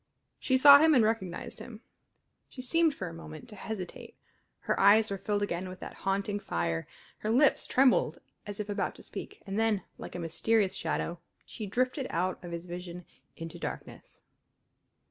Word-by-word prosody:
She 260 -2 +2
saw 285 +1 +10
him 315 0 +5
and 240 - +6
recognized 215 -5 -2
him; 225 -2 -10 0.7
she 255 - -9
seemed 325 +2 +2
for 190 - -5
a 165 - -7
moment 160 +5 -10
to 210 - -9
hesitate; 200 -2 -7 0.5
her - - -1
eyes 210 +2 +6
were 195 - -1
filled 205 +1 -1
again 185 -1 -3
with 185 0 -9
that - - -7
haunting 200 +1 -1
fire; 85 - -2 0.3
her 215 - -3
lips 265 +5 +4
trembled 260 -1 +3 0.3
as 205 0 -6
if 210 - -3
about 205 0 -2
to - - -13
speak; 415 - -8
and 195 +1 -2
then, 220 -4 +1 0.2
like - - -8
a - - -4
mysterious 190 +5 +1
shadow, 170 0 -2 0.3
she 215 - -7
drifted 255 +6 0
out 185 +2 -1
of 175 - -7
his 170 0 -5
vision 180 0 -7 0.3
into 165 -1 -7
darkness. - - -8
205 Hz, 175 wpm, -30 LUFS, 180-235 Hz, 0.7 s, saw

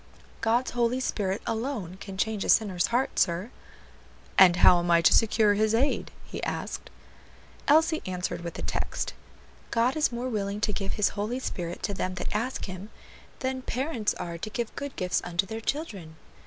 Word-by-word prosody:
"God's 235 +3 +2
Holy 240 +1 +1
Spirit, 200 -6 -1
alone, 225 -6 -3
can 195 -1 -7
change 215 0 0
a - - -4
sinner's 190 -6 +3
heart, 245 +3 0
sir." 180 +6 +1 0.8
"And 180 -2 +8
how 180 0 +7
am 175 0 -2
I 170 0 +6
to - - +6
secure 220 -1 +4
His 215 +2 +2
aid?" 270 +5 +1 0.2
he - - -6
asked. - - -4 0.8
Elsie 315 +2 +4
answered 180 -1 -3
with 170 -1 -6
a - - -5
text: - - -2 0.6
"God 235 +3 +2
is 310 -3 +2
more 240 +1 -3
willing 205 -3 -2
to 210 - +1
give 195 -1 -2
His 210 - +2
Holy 215 +4 -2
Spirit 175 -9 -4
to 200 - -1
them 185 -1 -2
that 180 - -4
ask 240 +5 -1
Him, 185 +2 -7 0.5
than 260 0 -1
parents 250 -4 -1
are 170 -1 -5
to 215 - -4
give 230 +1 -4
good 280 -1 -5
gifts 180 -1 0
unto 175 +2 0
their 220 +3 -5
children." 205 - -4
215 Hz, 180 wpm, -28 LUFS, 185-245 Hz, 0.8 s, And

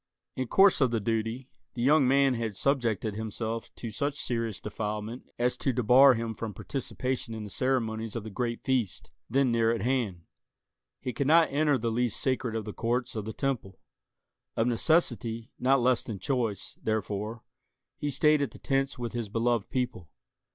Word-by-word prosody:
In 130 -1 -2
course 195 +4 +5
of 130 - +5
the 115 -1 0
duty, 115 +4 -2 0.2
the 120 - -2
young 140 0 +5
man 135 0 +4
had 115 -3 -3
subjected 115 -5 0
himself 110 +1 -4
to 115 - -6
such 140 +6 -1
serious 115 -4 -2
defilement 105 +2 -5
as 125 +1 +1
to 135 - 0
debar 125 +3 +6
him 115 0 -3
from 110 -1 -6
participation 130 -3 -3
in 110 - -5
the 105 - -8
ceremonies 115 -4 -1
of 115 - -3
the 110 - -7
great 120 +2 -3
feast, 125 -7 -1 0.2
then 130 +1 +2
near 115 -1 +3
at 115 - -1
hand. 115 -9 -1 0.8
He 125 - -3
could 135 +4 -1
not 165 +2 +5
enter 145 0 +3
the 115 -1 -1
least 120 0 +1
sacred 130 -3 0
of 110 -2 -3
the 105 - -6
courts 120 +1 -1
of 110 -2 -3
the 110 - -4
Temple. 125 -9 -3 0.8
Of 115 - +3
necessity, 120 -3 +1
not 130 0 +3
less 125 -1 +3
than 110 - -5
choice, 110 -2 -2
therefore, 110 +1 -2 0.6
he 145 - -1
stayed 150 +2 +3
at 140 - 0
the - - -13
tents 135 0 -1
with 120 -2 -4
his 120 -3 -3
beloved 115 0 0
people. 125 -10 -3
120 Hz, 180 wpm, -29 LUFS, 110-130 Hz, 0.8 s, debar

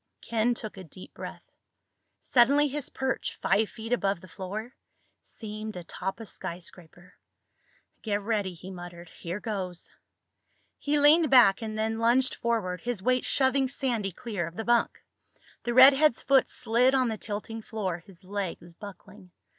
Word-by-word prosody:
Ken 235 +1 0
took 215 -3 -6
a 190 - -8
deep 180 +2 -12
breath. - - -8 0.8
Suddenly 280 +4 +4
his 285 -1 -4
perch, 265 0 -3
five 215 +1 +2
feet 225 +1 -5
above 200 -6 0
the 185 - -14
floor, 205 +7 -6 0.5
seemed 215 -1 -8
atop 180 +3 -5
a 225 - -7
skyscraper. 175 -2 -9 0.9
"Get 205 -2 -1
ready," 205 -3 -2
he 185 +3 -10
muttered. 175 -1 -9
"Here 175 +4 -6
goes." 190 -5 -5 0.9
He 295 +1 0
leaned 300 +2 +6
back 240 -7 +6
and 215 -1 -4
then 220 +1 -1
lunged 245 +3 +3
forward, 210 -7 -2
his 240 -6 -3
weight 255 +1 +2
shoving 265 0 +2
Sandy 240 -7 -2
clear 195 -3 -4
of 165 - -10
the 225 - -5
bunk. 240 0 +1 0.6
The 240 - 0
redhead's 270 +1 +7
foot 270 -2 +4
slid 250 +2 +2
on 260 -1 +3
the 220 -2 -2
tilting 225 +2 -5
floor, 195 -6 -3
his 180 +2 -17
legs 185 -3 -5
buckling. 200 0 -12
220 Hz, 150 wpm, -28 LUFS, 190-245 Hz, 0.9 s, redhead's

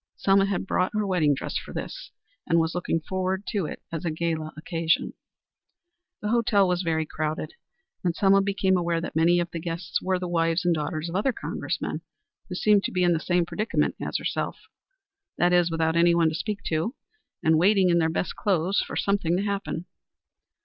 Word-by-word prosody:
Selma 195 0 +3
had 195 -2 -1
brought 185 -1 +1
her 215 -1 +1
wedding 165 -7 +2
dress - - -3
for - - -10
this, - - -6 0.4
and 165 - +3
was 160 0 0
looking 175 -2 -1
forward 190 +3 -2
to 195 -7 -1
it - - -8
as 165 +1 -4
a 170 - 0
gala 160 -1 -2
occasion. 165 +1 0 1.1
The 210 - -1
hotel 215 -4 +3
was 180 0 +1
very 160 -3 0
crowded, 155 0 -3 0.5
and 175 -2 0
Selma 195 0 +4
became 195 -1 +1
aware 170 -1 0
that 170 - -6
many 170 +2 +4
of 175 0 -2
the 170 - -4
guests 170 +2 -3
were 185 0 0
the 180 0 -4
wives 165 +1 +1
and 175 - +4
daughters 155 +1 -2
of 170 - -5
other 210 +8 +2
Congressmen, - - -4 0.5
who - - -4
seemed 210 -2 +4
to - - -2
be 180 -1 +1
in 175 -1 +4
the 165 - 0
same 175 +1 +1
predicament 215 +6 0
as - - -1
herself - - -2 0.8
that 175 0 +3
is, 175 -1 +4
without 160 0 0
anyone 170 -1 +4
to - - -5
speak 205 +5 -3
to 165 - -1 0.5
and 160 0 +4
waiting 190 0 +4
in 170 - +4
their 160 -1 +2
best 165 +1 -2
clothes 190 -1 +1
for - - -3
something 185 -4 +1
to 195 - -1
happen. 200 -4 -3
175 Hz, 195 wpm, -26 LUFS, 165-195 Hz, 1.1 s, Selma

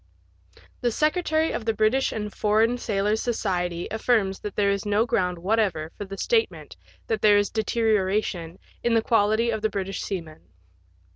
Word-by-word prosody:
The 240 - +1
secretary 315 +3 +1
of - - -3
the 225 0 -1
British 220 +5 +2
and 210 -1 -4
Foreign 220 +3 +2
Sailors* 210 0 0
Society 180 -7 -2
affirms 220 -3 +1
that 210 - -6
there 200 -1 +2
is 200 -1 -1
no 210 +2 +2
ground 180 -6 0
what 200 +7 0
ever 165 -7 -1
for 205 - -6
the 195 0 -8
statement 455 - -1 0.3
that 220 -2 -2
there 205 -1 +6
is 205 0 +1
deterioration 210 -6 0 0.3
in 235 -1 +2
the 225 - +3
quality 225 +1 +2
of 220 -1 -3
the 220 - +1
British 195 -1 -4
seaman. 165 -6 -6
210 Hz, 165 wpm, -25 LUFS, 195-225 Hz, 0.3 s, there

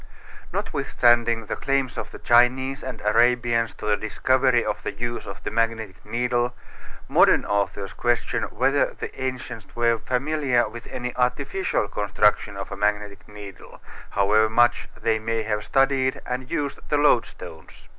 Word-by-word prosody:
Notwithstanding 120 -1 +1
the - - -3
claims 135 -2 -1
of - - -5
the - - -10
Chinese 130 +3 +2
and 130 -3 -6
Arabians 115 0 +2
to - - -9
the 105 -1 +3
discovery 125 +4 +1
of 105 - -2
the - - -3
use 120 0 -4
of 95 -2 -9
the - - -4
magnetic 110 -5 -2
needle, 120 0 -1 0.5
modern - - +4
authors 100 -1 -2
question 120 0 0
whether 135 +5 +1
the - - -6
ancients 125 -4 -5
were 115 -1 +2
familiar 130 -1 0
with 115 +2 -10
any 125 0 -5
artificial 135 - 0
construction 105 0 +1
of 100 - -6
a - - -4
magnetic 105 0 -2
needle, 105 -2 -11 0.3
however 105 +2 +3
much 120 +2 +2
they 110 -1 +1
may 115 0 -2
have 105 -1 -2
studied 135 +1 +1
and 125 +1 -4
used 145 -4 -2
the 150 - +2
loadstones. 145 -5 -1
120 Hz, 145 wpm, -24 LUFS, 105-130 Hz, 0.5 s, modern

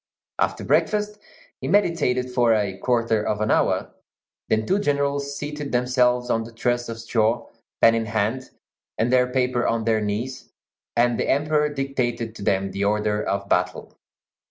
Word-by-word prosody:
After - - 0
breakfast 210 0 +1 0.4
he 130 - -5
meditated 150 -9 +1
for 120 -2 +3
a 100 -3 -1
quarter 115 -1 +1
of 105 -1 -1
an 110 0 0
hour; - - +1 0.6
then 110 0 +1
two 195 +2 +1
generals 140 -4 -1
seated 150 -1 -5
themselves 125 0 +2
on 115 - +1
the 115 - -10
truss 120 +1 -1
of 115 - -5
straw, 115 0 0 0.3
pen 115 - +7
in 115 -1 -1
hand 110 +5 -1 0.5
and 120 +3 +1
their 125 0 +4
paper 125 -1 +1
on 115 -1 0
their 110 -1 +1
knees, 110 +5 -4 0.5
and 120 0 +2
the - - -1
Emperor 150 +1 +2
dictated 125 -5 -2
to 115 - -11
them 95 -1 0
the 100 +1 -2
order 105 +1 +1
of 100 0 -2
battle. 90 -1 -1
120 Hz, 160 wpm, -23 LUFS, 110-135 Hz, 0.6 s, pen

